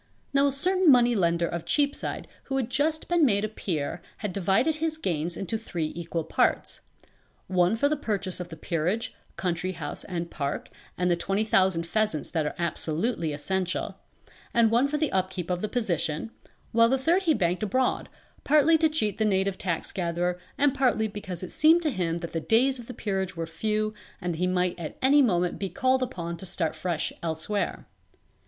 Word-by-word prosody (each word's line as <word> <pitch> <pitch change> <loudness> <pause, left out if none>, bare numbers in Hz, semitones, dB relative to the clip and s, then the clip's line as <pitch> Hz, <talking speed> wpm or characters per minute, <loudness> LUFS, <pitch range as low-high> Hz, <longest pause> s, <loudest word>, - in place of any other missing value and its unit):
Now 280 0 +4
a - - +1
certain 365 +5 +3
money 245 -1 +5
lender 170 -4 +2
of 170 -1 -4
Cheapside 285 -1 0 0.2
who 270 - -2
had 255 -2 -2
just 310 +3 0
been 345 -2 +3
made 210 -6 +3
a - - -1
peer 170 -7 -3 0.2
had 210 -4 -4
divided 200 - +2
his 315 0 -1
gains 170 - -2
into 200 +3 -3
three 170 -8 -3
equal 170 -1 -3
parts; 160 - 0 0.6
one 180 +2 +2
for 285 +6 +2
the 305 - +1
purchase 205 -10 -2
of 180 - -6
the 165 - -8
peerage, 175 +7 -2 0.2
country 180 0 -2
house 165 -3 -5
and 170 -2 -4
park, 140 -3 -4 0.3
and 180 0 +1
the - - +4
twenty 195 +4 0
thousand 190 -5 +2
pheasants 210 -3 -1
that 160 -3 0
are - - -4
absolutely 170 +2 0
essential, 185 +5 -2 0.6
and 230 -2 +5
one 240 +4 +4
for 300 +1 -1
the 305 -1 0
upkeep 185 -1 -1
of 180 0 -1
the 215 - -2
position, 175 -5 -1 0.4
while 230 0 +5
the 265 - +3
third 330 +8 +2
he 330 -5 +2
banked 180 -3 0
abroad, 250 +5 0 0.3
partly 305 +2 +5
to 320 0 +4
cheat 215 -11 -1
the - - +3
native 195 -2 +1
tax 170 -4 -2
gatherer 175 -1 -1 0.2
and 285 -2 +3
partly 250 -5 +2
because 190 -4 -6
it 185 - -6
seemed 325 +3 +5
to 305 - +1
him 170 -6 -1
that 170 -1 -6
the 165 - 0
days 255 +6 +3
of 235 - -10
the 250 - -7
Peerage 190 -4 -2
were 165 -1 -3
few 215 +6 -1 0.3
and 175 -1 -2
that - - -6
he 180 - +2
might 180 -1 0
at 160 -3 -6
any 285 +2 +6
moment 180 -8 +1
be 195 - -2
called 260 +8 +1
upon 170 -8 -4
to 190 - -8
start 170 -3 -1
afresh 165 0 -2
elsewhere. 170 +5 -2
195 Hz, 195 wpm, -27 LUFS, 170-250 Hz, 0.6 s, any